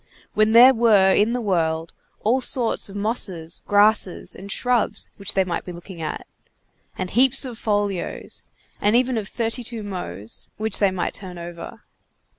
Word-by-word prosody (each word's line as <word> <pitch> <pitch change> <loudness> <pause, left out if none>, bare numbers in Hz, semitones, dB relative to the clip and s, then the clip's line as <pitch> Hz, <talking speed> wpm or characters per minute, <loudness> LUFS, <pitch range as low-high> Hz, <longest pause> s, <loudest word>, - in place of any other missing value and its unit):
when 215 +1 +3
there 250 +3 +9
were 210 -5 +4
in 215 +3 +3
the 245 - -1
world 165 -6 -1 0.3
all 245 +5 +2
sorts 240 -4 -1
of 195 - -10
mosses, 195 -6 -2
grasses, 205 -2 +2
and 200 +1 -8
shrubs 245 0 +1
which 200 0 -1
they 190 - +4
might 180 -2 -3
be 180 - -7
looking 175 0 -10
at, 155 - -4 0.7
and 180 - -4
heaps 260 +4 +3
of 250 -2 -6
folios, 205 -4 -2 0.4
and 205 +2 +3
even 250 +1 +2
of 215 -3 -3
32mos, 215 - -4
which 220 -2 -1
they 200 - +4
might 185 -2 -2
turn 185 -3 -7
over. 170 0 -9
205 Hz, 155 wpm, -22 LUFS, 180-230 Hz, 0.7 s, there